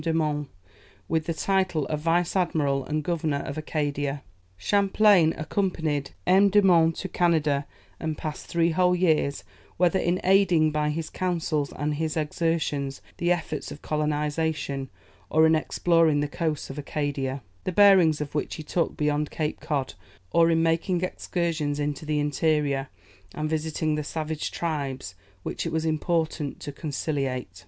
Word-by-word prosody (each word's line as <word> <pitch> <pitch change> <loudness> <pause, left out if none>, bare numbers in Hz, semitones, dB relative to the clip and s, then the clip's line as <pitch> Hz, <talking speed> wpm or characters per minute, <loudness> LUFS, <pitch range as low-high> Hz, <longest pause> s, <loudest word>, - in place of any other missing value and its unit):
de 165 - -1
Monts, 150 -3 -1 0.6
with 160 -1 -1
the 165 - 0
title 185 -5 +1
of 150 - -2
Vice 170 +3 +1
admiral 150 -7 +1
and 155 0 -2
Governor 155 -4 -1
of 140 - -5
Acadia. 145 -2 -2 0.3
Champlain 200 - +4
accompanied 155 -5 -1 0.2
M. 195 +2 +5
de 205 +2 +5
Monts 165 -3 +4
to 190 - -3
Canada, 155 -6 +1 0.3
and 160 -2 -3
passed 155 -2 -6
three 170 0 +2
whole 180 +2 +3
years, 160 -5 +1 0.3
whether 180 +1 +3
in 175 +2 +1
aiding 180 -5 +4
by 150 0 0
his 160 +1 -3
counsels 165 -5 -1
and 150 +2 -2
his 155 +1 -2
exertions 150 -3 -1 0.2
the 175 +1 +1
efforts 165 -3 -2
of 145 - -10
colonization, 150 -2 -1 0.4
or 160 +1 +5
in 160 - +5
exploring 160 -1 +2
the 145 - 0
coasts 155 -1 -3
of 140 - -7
Acadia, 140 -3 -3 0.2
the - - -2
bearings 185 -5 +6
of 150 -1 -5
which 150 - -2
he 155 - -7
took 170 +2 -1
beyond 150 0 0
Cape 155 -1 -3
Cod, 145 -5 -2 0.4
or 165 0 +5
in 165 0 +3
making 170 +2 +1
excursions 165 -5 -2
into 145 +1 -3
the 150 -1 +1
interior 145 -2 0 0.5
and 155 0 -2
visiting 155 0 -1
the 150 0 -1
savage 155 0 -3
tribes 140 - -3 0.3
which - - -3
it - - -3
was 160 0 -1
important 160 -2 -1
to 145 - -5
conciliate. 135 - -3
155 Hz, 155 wpm, -26 LUFS, 145-170 Hz, 0.6 s, bearings